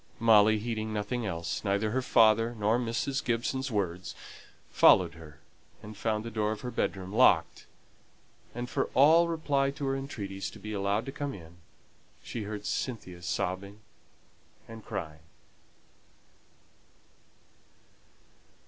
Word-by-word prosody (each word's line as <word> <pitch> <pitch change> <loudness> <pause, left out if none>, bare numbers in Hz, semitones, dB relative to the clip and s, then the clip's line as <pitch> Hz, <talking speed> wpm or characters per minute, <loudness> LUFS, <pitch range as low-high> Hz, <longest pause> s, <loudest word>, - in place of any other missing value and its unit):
Molly, 110 -1 +5
heeding 110 0 -3
nothing 110 +2 -2
else 85 -3 -3
neither 100 +1 0
her 130 +3 0
father 115 -1 +4
nor 110 +3 +2
Mrs. 125 +5 -2
Gibson's 130 +3 -1
words 95 -5 -3 0.6
followed 85 -2 +5
her, 80 -2 -13 0.5
and 105 0 -9
found 110 +1 -2
the 115 - -5
door 105 -1 0
of 110 - -5
her 125 - -5
bedroom 95 -4 -3
locked, - - +3 0.9
and 120 0 -4
for - - -1
all 160 +5 +6
reply 145 -4 0
to 140 +1 -5
her 135 0 0
entreaties 100 -8 -5
to - - -12
be 105 +1 -6
allowed 100 +2 0
to 135 - -5
come 145 -2 -4
in, 85 -2 -13 0.7
she 115 -3 -5
heard 105 0 -6
Cynthia 95 -8 -4
sobbing 95 +4 -3 0.9
and 115 -1 -10
crying. 80 -1 -6
110 Hz, 130 wpm, -29 LUFS, 100-120 Hz, 0.9 s, all